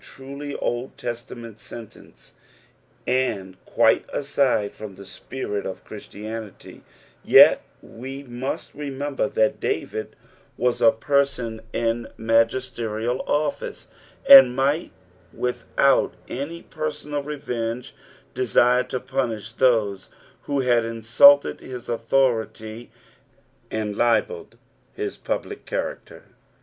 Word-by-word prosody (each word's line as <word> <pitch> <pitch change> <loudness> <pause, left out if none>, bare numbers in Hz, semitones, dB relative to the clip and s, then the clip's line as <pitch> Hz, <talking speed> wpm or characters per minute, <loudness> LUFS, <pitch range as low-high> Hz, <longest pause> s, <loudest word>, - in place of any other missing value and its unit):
truly 140 +2 -8
Old 120 +2 -3
Testament 115 -2 -7
sentence, 115 -1 -13 0.7
and 110 -8 -1
quite - - +3
aside 135 -7 0
from 105 -3 -9
the 100 +1 -12
spirit 105 -2 -5
of 95 - -7
Christianity, 110 0 -9 0.4
yet - - +7 0.2
we 135 +4 -8
must 125 +1 -5
remember 140 -1 -3
that 135 0 +1
David 110 -6 -3 0.4
was 125 -1 +1
p 115 - +7
person 140 -6 0
in 115 0 -1
magisterial 115 +1 0
office, 145 0 -2 0.4
niid 135 -2 +11
might 140 +5 0 0.4
without 125 +2 +1
any 150 +6 -5
personal 150 -1 -4
revenge, 125 -5 -4 0.4
desire 125 0 +3
to 130 - -3
punish 120 -5 -3
those 110 -6 +1 0.4
who 140 -1 0
had 120 -2 +3
insulted 115 +5 +5
his 125 -2 -9
authority 115 -2 -1 0.8
and 105 -2 -3
libelled 420 - 0 0.4
his 415 -1 -4
public 415 - -5
chsracter. - - -5
125 Hz, 100 wpm, -23 LUFS, 115-140 Hz, 0.8 s, niid